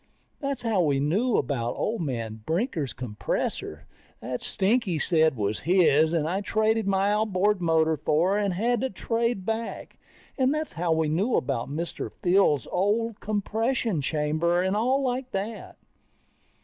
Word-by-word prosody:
That's 275 -2 -3
how 220 -5 +2
we 145 -5 +2
knew 200 - +1
about 120 -3 -1
old 225 -3 -2
man 115 -7 -4
Brinker's 165 - -1
compressor 120 -4 -4 0.3
that 125 0 -5
Stinky 200 -3 +1
said 160 -2 +3
was 105 0 -1
his 160 -2 +4
and 160 -2 0
I 190 +4 -1
traded 220 +1 +1
my 195 +1 +2
outboard 210 -2 +1
motor 160 -1 +2
for 155 +6 +1
and 200 -3 0
had 235 +4 +1
to 265 - 0
trade 230 -2 -1
back. 225 +2 -4 0.4
And 260 0 +3
that's 310 0 -3
how 170 0 -1
we 160 -1 +2
knew 190 +11 +1
about 120 -1 -1
Mr. 165 +4 -4
Fields' 175 - +3
old 210 +4 0
compression 215 - -1
chamber, 155 +4 0
and 190 +2 +1
all 255 +6 +1
like 255 0 -2
that. 205 +4 -5
190 Hz, 150 wpm, -26 LUFS, 155-225 Hz, 0.4 s, his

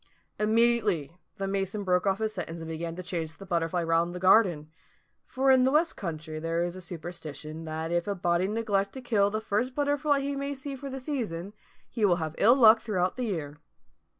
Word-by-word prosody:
Immediately 215 - +2 0.2
the 195 - -3
mason 195 +1 -2
broke 180 0 +1
off 195 0 +2
his 220 0 -2
sentence 170 -4 -5
and 165 - -7
began 165 +1 -4
to 185 - -6
chase 165 -3 -4
the 195 - -11
butterfly 170 -1 0
round 165 +1 +1
the - - -4
garden: 180 -5 +4 0.6
for 265 +1 +2
in 260 -1 +5
the 260 - +4
West 310 +5 +2
country 160 -3 -5
there 165 +1 -1
is 175 0 -3
a 185 - -8
superstition 165 -2 -7
that 160 +1 -4
if 175 +1 0
a 200 - -1
body 175 0 +1
neglect 205 -2 0
to 265 - -7
kill 210 -5 +2
the 215 +1 -2
first 220 +4 -1
butterfly 290 0 +1
he 280 +1 -2
may 280 +1 -3
see 275 +1 -6
for 275 +1 -7
the 270 0 -5
season, 215 - -4 0.3
he 230 - -4
will 185 -4 +5
have 160 -3 -3
ill 235 +4 +6
luck 225 -4 +7
throughout 185 -4 -1
the 250 - -2
year. 150 -8 -4
195 Hz, 205 wpm, -28 LUFS, 170-235 Hz, 0.6 s, luck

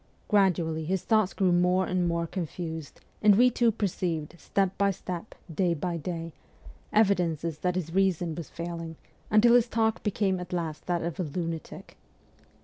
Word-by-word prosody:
Gradually 175 -6 +2
his 185 +3 -1
thoughts 215 -4 +2
grew 190 -3 +1
more 180 +1 +3
and 180 -1 0
more 170 0 0
confused, 160 -3 -6 0.2
and 210 -1 +6
we 250 +4 +5
two 235 -1 +3
perceived, 180 -7 -2
step 195 -1 0
by 200 0 +2
step, 185 +1 -5 0.2
day 175 +1 +1
by 170 +2 -2
day, 165 0 -5 0.6
evidences 170 -7 +1
that 180 +1 0
his 165 -3 -3
reason 180 -3 +1
was 165 -2 -7
failing, 165 -1 -6 0.3
until 225 +3 +6
his 245 -1 +5
talk 225 -1 0
became 195 -3 0
at 180 0 -7
last 165 -3 -3
that 175 -2 0
of 170 +2 -4
a - - +1
lunatic. 165 +1 -5
180 Hz, 160 wpm, -28 LUFS, 165-195 Hz, 0.6 s, and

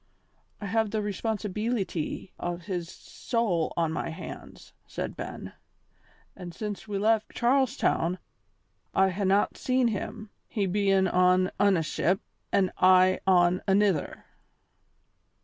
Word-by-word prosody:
"I 210 - -6
have 220 +2 +1
the 220 - -1
responsibeelity 210 -3 -3
o' 175 0 -3
his 175 -2 -5
soul 205 -9 -2
on 165 -2 +1
my 160 - -3
hands," 165 +3 -10
said - - -5
Ben, - - -7 0.8
"an' 175 -2 -8
since 210 0 -6
we 205 -1 -3
left 220 +1 +1
Charles 260 +1 +2
Town 170 +3 +1 0.8
I 190 0 +4
hae 195 +2 -2
not 195 +2 +2
seen 255 -2 +1
him, 215 0 -5 0.2
he 205 -4 -1
bein' 195 0 +2
on 180 +1 +3
ane 195 -5 +3
ship 185 +4 0 0.3
an' 190 -2 +2
I 185 0 +5
on 180 -1 +4
anither." 195 -5 +1
195 Hz, 125 wpm, -27 LUFS, 180-215 Hz, 0.8 s, I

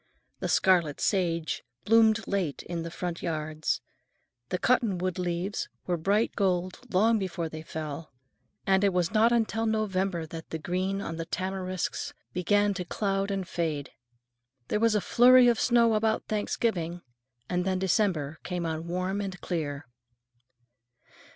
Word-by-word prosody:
The - - -2
scarlet 175 -6 +3
sage 170 -5 0 0.2
bloomed 225 0 +4
late 185 -8 -1
in 170 -1 -4
the 165 - -5
front 175 0 -4
yards, 155 -1 -2 0.7
the 180 - 0
cottonwood 185 -6 +1
leaves 180 +3 -2 0.2
were 180 - 0
bright 200 +7 +1
gold 185 -2 0
long 220 +4 +4
before 175 -4 -3
they 155 0 -7
fell, 155 -1 -6 0.5
and 190 0 +3
it 200 -2 +3
was 180 -2 +1
not 225 +2 +5
until 225 -1 +1
November 195 -5 0
that 160 +1 -9
the 160 - -3
green 185 +4 -2
on 165 -4 -5
the 165 0 -4
tamarisks 185 -1 -3 0.2
began 205 +3 +2
to 185 -1 -3
cloud 195 +2 -1
and 195 -2 -2
fade. 155 -6 -2 0.8
There 210 - +1
was 230 -1 +3
a 210 - +2
flurry 250 +3 +6
of 235 -2 +3
snow 235 -2 +4
about 220 0 +1
Thanksgiving, 180 -5 -1 0.4
and 180 0 0
then 190 0 0
December 180 -6 0
came 180 -1 -3
on 160 0 -3
warm 185 +3 -1
and 190 -3 -5
clear. 150 -4 -3
185 Hz, 145 wpm, -28 LUFS, 170-205 Hz, 0.8 s, flurry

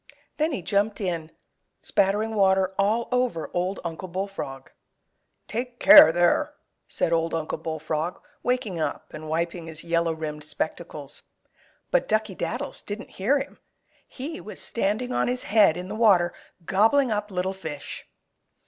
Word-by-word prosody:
Then 315 +2 +1
he 200 - -3
jumped 205 +2 +1
in, 170 -5 -2 0.5
spattering 205 +3 +1
water 190 -2 +3
all 215 +4 +2
over 250 -10 0
Old 180 +2 -1
Uncle 170 +2 -5
Bullfrog. 175 -8 -5 0.8
"Take 240 +2 -4
care, 160 - +10
there!" 175 +1 +2 0.3
said 165 - 0
Old 165 0 +1
Uncle 160 -1 -3
Bullfrog, 160 +1 -3 0.2
waking 235 -8 -1
up 155 - -3
and 155 0 -7
wiping 170 +1 -2
his 160 -1 -9
yellow 170 0 +1
rimmed 150 -1 -5
spectacles. 150 -1 -4 0.7
But - - +2
Duckey 215 -2 +1
Daddles 265 +9 -3
didn't 205 +1 -7
hear 265 +9 +3
him. 275 - -6 0.5
He 280 - -6
was 210 +5 -9
standing 230 +4 -1
on - - +1
his 250 0 -1
head 205 -5 +4
in 180 +1 -5
the 200 - -5
water, 195 -6 +4 0.3
gobbling 225 - +3
up 210 0 -1
little 185 0 -1
fish. 160 -7 -7
190 Hz, 145 wpm, -25 LUFS, 165-220 Hz, 0.8 s, care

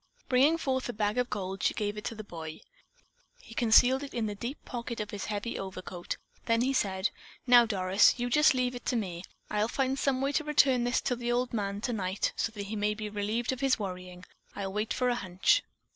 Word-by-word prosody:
Bringing 275 +6 +4
forth 260 -5 -1
the 245 - -3
bag 210 +2 0
of 250 -1 0
gold, 195 -2 -4
she - - +1
gave 205 -1 -2
it 210 - -7
to 230 - -3
the 215 - -7
boy. 160 -5 -8 0.8
He 230 - -13
concealed 245 +3 +5
it 285 - -8
in 230 -2 0
the 210 - -2
deep 235 +7 -5
pocket 235 -1 -5
of 210 - -4
his 205 -2 -4
heavy 210 +2 -3
overcoat; 185 -2 -6 0.3
then 230 0 +3
he 265 +2 +1
said: 190 -5 0 0.3
"Now, 245 -2 +7
Doris, 190 0 +4
you 245 0 -1
just 300 +3 +5
leave 250 -1 0
it 245 - -7
to - - +1
me. 180 -7 -2 0.3
I'll 210 +1 +1
find 265 +2 -1
some 270 -2 +1
way 275 +1 0
to 310 - 0
return 275 -5 +3
this 245 +1 +1
to 250 - 0
the 240 0 -2
old 245 +1 0
man 200 -2 -2
tonight 205 -6 -1
so 225 - -1
that 205 -2 -5
he 205 +2 -5
may 210 0 0
be 215 0 -5
relieved 215 +4 -1
of 260 - -4
his 270 0 +2
worrying. 180 -3 -6 0.3
I'll 195 -1 -4
wait 210 +2 -2
for 250 - +1
a - - +2
hunch." 190 - +2
225 Hz, 225 wpm, -30 LUFS, 200-250 Hz, 0.8 s, Now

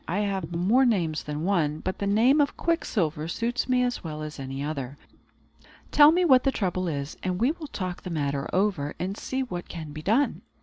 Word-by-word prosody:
I 190 +5 0
have 195 -5 -2
more 205 +10 +3
names 175 - +1
than 150 +1 -5
one; 165 -6 +1
but 185 +4 -4
the 200 - -1
name 240 +9 +4
of 285 - 0
Quicksilver 170 - -1
suits 235 +8 -2
me 250 0 +3
as 245 0 -2
well 155 -2 -5
as 150 -1 -7
any 135 +1 -5
other. 140 -3 -4 0.9
Tell 295 +1 +8
me 355 +2 +2
what 260 -5 +6
the 270 - +2
trouble 185 -5 -1
is, 140 -2 -4
and 185 -1 -2
we 245 +6 +3
will 320 -2 -8
talk 185 -9 -5
the 185 - -7
matter 140 -4 -2
over, 185 -7 0
and 190 +2 -3
see 265 +4 -3
what 175 -9 -6
can 160 -3 -7
be 155 +1 -7
done." 225 - +1
185 Hz, 210 wpm, -26 LUFS, 155-245 Hz, 0.9 s, Tell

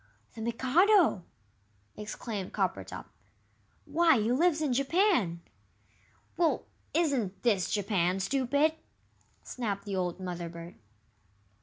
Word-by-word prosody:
"The 225 - -8
Mikado!" 260 - +3 0.7
exclaimed 210 -2 -6
Coppertop; - - -2 0.8
"why, 330 -6 +4
he 220 +2 0
lives 315 +4 +3
in 295 -5 0
Japan!" 275 - +2 1.0
"Well, 335 -2 +2 0.3
isn't 270 - 0
this 205 -7 +2
Japan, 190 -3 0
stupid?" 275 +8 +1 0.7
snapped 210 -5 -4
the 200 -2 -3
old 180 -1 -2
Mother 175 -2 -5
bird. 170 +1 -9
230 Hz, 100 wpm, -30 LUFS, 190-305 Hz, 1.0 s, why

